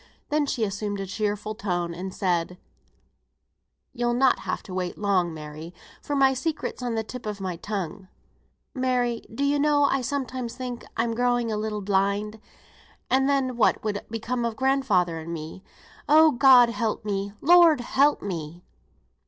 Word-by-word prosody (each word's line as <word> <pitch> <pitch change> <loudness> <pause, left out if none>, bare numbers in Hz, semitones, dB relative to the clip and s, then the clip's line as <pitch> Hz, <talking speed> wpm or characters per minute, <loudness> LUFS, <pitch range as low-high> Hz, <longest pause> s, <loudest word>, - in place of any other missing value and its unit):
Then 295 -1 +1
she 235 - -1
assumed 205 0 -3
a 195 - -3
cheerful 210 +2 -3
tone, 175 -5 -2
and 185 +3 -6
said, 180 -2 -1 1.4
"You'll 240 0 0
not 260 +1 +3
have - - -4
to 190 - -9
wait 180 -1 -3
long, 190 -4 +1
Mary, 155 +2 -9 0.3
for 290 - -3
my 270 -1 +4
secret's 300 +1 -3
on 240 -2 -2
the 220 - -1
tip 245 +1 -8
of 210 -1 -4
my 185 -2 -3
tongue. 190 -1 -5 0.7
Mary! 250 -3 0
do 265 +5 -3
you 285 +1 +2
know 290 0 +3
I 275 -1 +2
sometimes 255 -2 -3
think 250 -2 -6
I'm 230 0 0
growing 245 -1 +1
a - - -1
little 210 0 -3
blind, 200 +2 0 0.7
and 265 +1 +3
then 265 -3 +1
what 230 - +2
would 210 -2 -2
become 230 +2 -3
of 230 -1 -2
grandfather 220 -11 +1
and 160 +1 -7
me? 165 +3 -7 0.5
Oh, 315 +1 +7
God 250 -2 +6
help 225 -2 -2
me, 200 -1 -2
Lord 335 -3 +6
help 280 +4 +2
me!" 170 -3 -6
220 Hz, 160 wpm, -25 LUFS, 195-260 Hz, 1.4 s, Oh